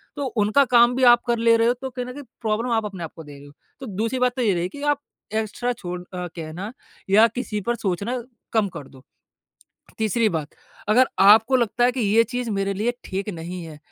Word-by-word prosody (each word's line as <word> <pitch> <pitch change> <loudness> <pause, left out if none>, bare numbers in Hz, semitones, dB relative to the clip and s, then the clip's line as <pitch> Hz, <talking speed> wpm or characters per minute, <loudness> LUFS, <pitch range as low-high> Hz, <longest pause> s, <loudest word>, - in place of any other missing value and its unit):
तो 285 -1 -3 0.2
उनका 245 +7 +4
काम 240 +1 +6
भी 260 - 0
आप 240 -1 +7
कर 235 -1 +2
ले 230 0 +4
रहे 230 0 +3
हो 240 - +4
तो 265 - -4
कहीं 250 -1 -5
न 250 - -7
कहीं 285 +2 -9 0.2
प्रॉब्लम 230 +2 -1
आप 225 -2 +1
अपने 190 -4 -6
आपको 160 0 -9
दे 145 - -12
रहे 140 - -14
हो। 145 - -16 0.3
तो 265 - -7
दूसरी 225 +6 -2
बात 250 0 +2
तो 255 - -2
ये 215 -5 +3
रहेगी 180 +10 -3
कि - - -7
आप 290 -1 +1 0.3
एक्स्ट्रा 220 +3 -1
छोड़ 180 -4 -6
अ, 180 0 -6
कहना 170 +6 -6 0.4
या 215 +4 +6
किसी 210 -4 -3
पर 240 +4 -1
सोचना 220 +5 -2 0.3
कम 220 -3 +3
कर 140 -4 -9
दो। 130 -1 -17 1.0
तीसरी 220 +1 +2
बात 160 -5 -3 0.4
अगर 250 +5 +5
आपको 220 +6 +7
लगता 240 0 +1
है 250 - +3
कि 255 - -3
ये 225 +1 +4
चीज़ 245 0 -4
मेरे 195 -1 -1
लिए 220 +5 0
ठीक 195 +2 -4
नहीं 170 +2 -6
है 155 -2 -10
220 Hz, 230 wpm, -23 LUFS, 190-245 Hz, 1.0 s, आप